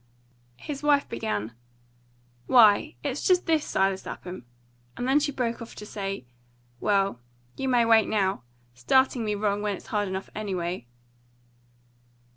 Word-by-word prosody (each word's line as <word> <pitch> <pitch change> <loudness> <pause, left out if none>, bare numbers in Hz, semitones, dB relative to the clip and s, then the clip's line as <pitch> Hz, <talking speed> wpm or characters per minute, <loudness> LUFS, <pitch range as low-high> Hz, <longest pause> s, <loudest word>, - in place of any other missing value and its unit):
His 280 - -6
wife 290 -1 +3
began, 110 -1 -3 0.9
"Why, 235 +4 +5
it's 280 -1 -2
just 365 -1 +3
this, 320 -3 +2
Silas 195 0 0
Lapham!" 180 -9 -8 0.5
and 245 - -2
then 270 +3 +4
she 295 0 -1
broke 240 -3 -2
off 230 - -9
to 210 - -8
say, 195 -8 -5 0.5
"Well, 195 - +1 0.4
you 265 - -2
may 240 -2 +4
wait, 225 -1 +5
now 195 -6 +1 0.3
starting 245 - +2
me 210 -1 -1
wrong, 205 0 0
when 205 -2 -1
it's - - -15
hard 205 -1 +1
enough 190 0 -5
anyway." 180 - -3
210 Hz, 140 wpm, -26 LUFS, 190-260 Hz, 0.9 s, Why